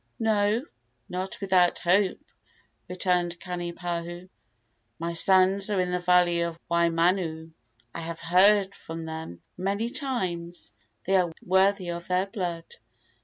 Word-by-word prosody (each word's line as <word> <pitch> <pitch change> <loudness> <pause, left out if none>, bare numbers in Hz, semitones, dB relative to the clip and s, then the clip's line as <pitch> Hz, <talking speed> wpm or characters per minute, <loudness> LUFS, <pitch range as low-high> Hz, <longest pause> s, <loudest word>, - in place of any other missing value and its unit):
"No, 215 +1 +1 0.5
not 185 +1 -5
without 185 -3 +3
hope," 185 +2 +2 0.7
returned 180 -1 0
Kanipahu. 175 0 -5 0.7
"My 170 +1 -3
sons 190 +3 +4
are 205 -2 0
in 180 -1 0
the 180 - 0
valley 175 -1 +3
of 170 -1 -2
Waimanu. 170 -1 +1 0.4
I - - -5
have 165 0 -6
heard 190 +3 +4
from 165 0 -8
them 160 - -7
many 200 +5 -1
times. 180 - -4 0.3
They 190 +1 +2
are 175 -2 +1
worthy 190 0 +2
of 170 0 -6
their 180 +1 +1
blood. 175 -4 -4
180 Hz, 120 wpm, -26 LUFS, 170-190 Hz, 0.7 s, sons